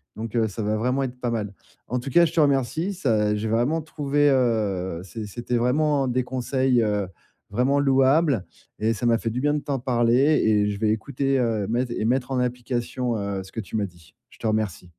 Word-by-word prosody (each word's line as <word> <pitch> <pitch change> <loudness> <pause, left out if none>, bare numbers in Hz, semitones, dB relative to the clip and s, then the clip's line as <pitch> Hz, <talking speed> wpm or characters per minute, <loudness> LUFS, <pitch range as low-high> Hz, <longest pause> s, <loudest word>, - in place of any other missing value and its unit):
donc 115 +1 -6
heu, 115 -2 +2
ça 110 +1 -5
va 105 +1 0
vraiment 125 +4 0
être 125 -1 -5
pas 125 - -2
mal. 105 -4 -3 0.3
En 125 - -1
tout 135 - -6
cas, 170 +6 +5
je 165 - -3
te 165 - +1
remercie 140 - +1
ça 110 - +1
j'ai 105 +1 -2
vraiment 125 +9 +1
trouvé, 145 -1 +1
heu, 105 -9 0
c'est 105 +3 -7
c'était 120 +3 -3
vraiment 140 +3 +2
des 125 +1 0
conseils, 130 0 +1
heu, 105 -3 0 0.4
vraiment 125 +6 +1
louables 135 - +3 0.3
et 110 +2 +1
ça 120 +2 -4
m'a 115 -1 +4
fait 115 - -3
du 120 +3 -3
bien 145 +1 +2
de 150 - 0
t'en 140 -2 -3
parler 120 -1 +2 0.3
et 105 -1 +3
je 100 - -5
vais 110 0 +1
écouter, 135 +4 -1
heu, 110 -4 0
mette 120 +2 -1
et 110 - -2
mettre 125 +2 0
en 130 - 0
application, 125 -1 -2
heu, 100 -1 -3
ce 95 - -14
que 115 - -6
tu 100 0 -7
m'as 105 -2 +1
dit. 85 -4 -15
Je - - -19
te 115 - -2
remercie. 110 -5 -1
120 Hz, 220 wpm, -24 LUFS, 110-135 Hz, 0.4 s, cas